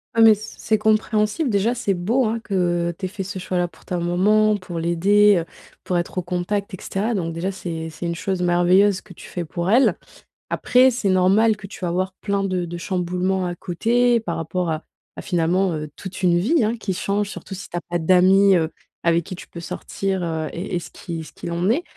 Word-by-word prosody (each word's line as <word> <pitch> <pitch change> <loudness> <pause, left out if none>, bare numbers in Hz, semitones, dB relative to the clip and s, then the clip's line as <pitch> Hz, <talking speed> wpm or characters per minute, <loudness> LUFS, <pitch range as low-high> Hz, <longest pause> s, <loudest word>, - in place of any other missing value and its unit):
Ah 225 - +4
mais, 220 -1 +9
c 215 +1 -8
c'est 215 0 +1
compréhensible. 215 +4 +1
Déjà, 205 +5 +1
c'est 205 -5 0
beau, 225 +9 +1
hein, 225 +1 -1
que 175 -3 0
tu 190 - -4
aies - - 0
fait 195 +1 -7
ce 195 +1 -6
choix-là 180 -1 -1
pour - - -21
ta 180 -1 -2
maman, 210 +5 +3
pour 175 -3 -6
l'aider, 200 +5 +4
heu, 165 - -1 0.4
pour 180 -1 0
être 175 - -5
au 180 - 0
contact 190 +4 -2
et - - -4
cetera. 215 +5 -2
Donc 170 -5 -2
déjà, 175 +4 -2
c'est 165 -4 -5
c'est 170 +2 -5
une 170 - -2
chose 185 +1 -2
merveilleuse 180 +3 +3
que 190 - -14
tu - - -12
fais 175 -2 -4
pour 175 +4 -3
elle. 250 +5 +5 0.6
Après, 255 +1 +4
c'est 225 -5 -1
normal 200 +4 +4
que 200 - -10
tu 195 - -10
vas - - 0
avoir 185 +2 -1
plein 200 -1 0
de 185 -2 -1
de 170 +1 -6
chamboulements 180 +1 -1
à 175 - -4
côté 235 +7 +2
par 170 -7 -4
rapport 170 +1 -2
à 155 0 -2 0.3
à - - -6
finalement, 180 +1 +1
heu, 150 -1 -4
toute 190 0 -8
une 175 -1 +4
vie, 250 - +2
hein, 225 +2 0
qui 195 -4 -3
change, 200 +2 -1
surtout 195 - -8
si 200 - -8
tu - - -9
as 175 - -1
pas 175 - -3
d'amis, 185 +3 +5
heu, 160 -2 +1 0.3
avec 170 -1 +2
qui 185 - -6
tu - - -11
peux 170 - -9
sortir, 190 +2 -3
he, 160 -2 -2
et 180 +2 -4
et 175 - +1
ce - - -11
qui 165 -2 -6
ce - - -13
qu'il 170 - -6
en 170 +2 -1
est. 325 +8 +1
185 Hz, 230 wpm, -22 LUFS, 175-205 Hz, 0.6 s, mais